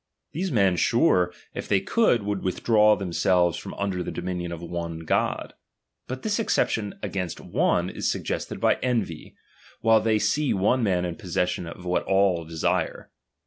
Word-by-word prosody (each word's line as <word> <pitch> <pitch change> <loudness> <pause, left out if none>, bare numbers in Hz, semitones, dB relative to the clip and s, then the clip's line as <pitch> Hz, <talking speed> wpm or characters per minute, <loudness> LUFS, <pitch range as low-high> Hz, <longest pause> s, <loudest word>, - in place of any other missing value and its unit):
These 180 +4 -2
men, 95 -6 +3
sure, 105 - +3 0.2
if - - -5
they 100 - +3
could, 125 - +2
would 100 -1 -2
withdraw 105 +3 +3
themselves 90 -2 +1
from - - -7
under 100 -3 -2
the - - -4
dominion 90 -1 -4
of 85 - -5
one 85 -1 -5
God. 80 - -1 0.5
But 130 +1 -6
this 215 +1 0
excep 225 - +2
tion 105 -3 -3
against 90 -4 -3
one - - +1
is - - -1
suggested - - -4
by - - +3
envy, 115 -11 -2 0.5
while 115 -1 +5
they 110 0 +2
see 145 +6 +1
one 105 +7 +2
man 90 -5 +1
in 85 -1 -4
possession 90 -3 -2
of 90 +2 -9
what 90 0 +1
all 95 -4 +2
desire. 80 0 -2
95 Hz, 165 wpm, -25 LUFS, 90-115 Hz, 0.5 s, while